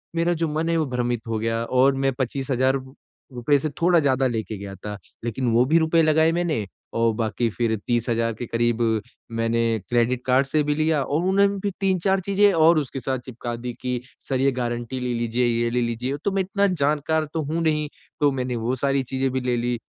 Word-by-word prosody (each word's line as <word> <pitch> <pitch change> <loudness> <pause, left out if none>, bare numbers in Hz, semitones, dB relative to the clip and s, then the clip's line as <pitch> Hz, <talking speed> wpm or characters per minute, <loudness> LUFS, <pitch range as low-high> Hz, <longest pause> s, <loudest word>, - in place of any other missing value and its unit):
मेरा 170 +1 +2
जो 165 -1 -1
मन 155 +2 -1
है। 165 - +2
वो 160 - +1
भ्रमित 120 -1 -1
हो 110 -1 -1
गया 115 +1 -1
और 130 +3 +3
मैं 135 0 +1
25,000 130 0 0
रु 130 0 -6 0.4
रुपए 125 +4 +2
से 155 - -2
थोड़ा 175 -1 +5
ज़्यादा 135 -2 +2
लेके 110 -3 -3
गया 100 0 -7
था 105 +2 -7 0.3
लेकिन 120 +1 -1
वो 115 +2 +4
भी 155 +5 +3
रुपए 160 +1 +3
लगाएँ 160 +1 +4
मैंने 165 - -1 0.3
और 115 0 +2
बाकी 115 +1 -1
फिर 115 0 0
30,000 115 -1 0
के 120 - -3
क़रीब 120 0 0 0.5
मैंने 115 0 0 0.3
क्रेडिट 120 +1 +1
कार्ड 130 +2 +3
से 150 +1 +1
भी 150 0 0
लिया 155 -1 +1
और 145 +3 -1
उन्होंने 200 +2 +4
भी 200 +1 -2
3-4 190 0 +2
चीज़ें 200 +2 +3
और 160 0 +5
उसके 135 -1 -4
साथ 130 +2 -2
चिपका 120 -1 -5
दीं 120 +1 -5
कि 125 -1 -2 0.3
सर 130 - 0
ये 140 - +3
गारंटी 120 0 -3
ले 125 -1 -1
लीजिए 120 +1 0
ये 120 0 +1
ले 125 +1 0
लीजिए। 120 +4 -2
तो 200 - +2
मैं 195 - +2
इतना 200 +2 +1
जानकार 155 -1 +1
तो 160 - -1
हूँ 160 +4 -2
नहीं 150 -2 +1 0.3
तो 145 -1 +4
मैंने 125 -2 -2
वो 115 +3 -1
सारी 135 +1 0
चीज़ें 130 +1 -1
भी 130 0 -1
ले 125 -1 0
ली 120 0 -1
130 Hz, 215 wpm, -23 LUFS, 120-155 Hz, 0.5 s, थोड़ा